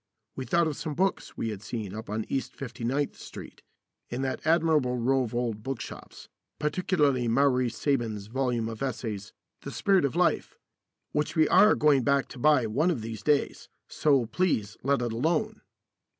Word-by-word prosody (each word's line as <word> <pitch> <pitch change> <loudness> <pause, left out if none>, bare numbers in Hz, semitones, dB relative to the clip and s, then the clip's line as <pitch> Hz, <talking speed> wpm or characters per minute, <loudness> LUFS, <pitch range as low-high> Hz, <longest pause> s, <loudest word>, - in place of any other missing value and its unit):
We 130 - -5
thought 170 +8 +2
of 155 -2 -2
some 155 -3 -4
books 190 +4 -1
we 115 - -2
had 105 -3 -6
seen 110 -3 -5
up 110 0 -7
on 110 +1 -2
East 135 - -3
Fifty 125 -2 -7
ninth 135 +4 0
Street, - - -10 0.5
in 125 +2 -3
that 130 - -2
admirable 155 -6 +3
row 130 +3 +2
of 120 -2 -4
old 115 -3 -1
bookshops, 135 +3 -7 0.3
particularly 150 -5 +1
Mowry 130 +1 +3
Saben's 115 -4 -1
volume 120 0 -1
of 110 -1 -7
essays, 110 -6 -4 0.3
"The - - -7
Spirit 195 -4 +2
of 140 +2 0
Life," 180 0 +1 0.5
which 150 0 -1
we 155 -2 +4
are 205 +4 +6
going 145 -3 +4
back 140 +1 +2
to 125 - -10
buy 145 -2 +4
one 140 +11 +1
of 135 -11 -1
these 110 -2 -6
days; 145 +2 0 0.2
so 140 -5 +2
please 115 - 0
let 140 -1 +1
it 120 -2 -2
alone. 175 - 0
130 Hz, 175 wpm, -28 LUFS, 115-150 Hz, 0.5 s, are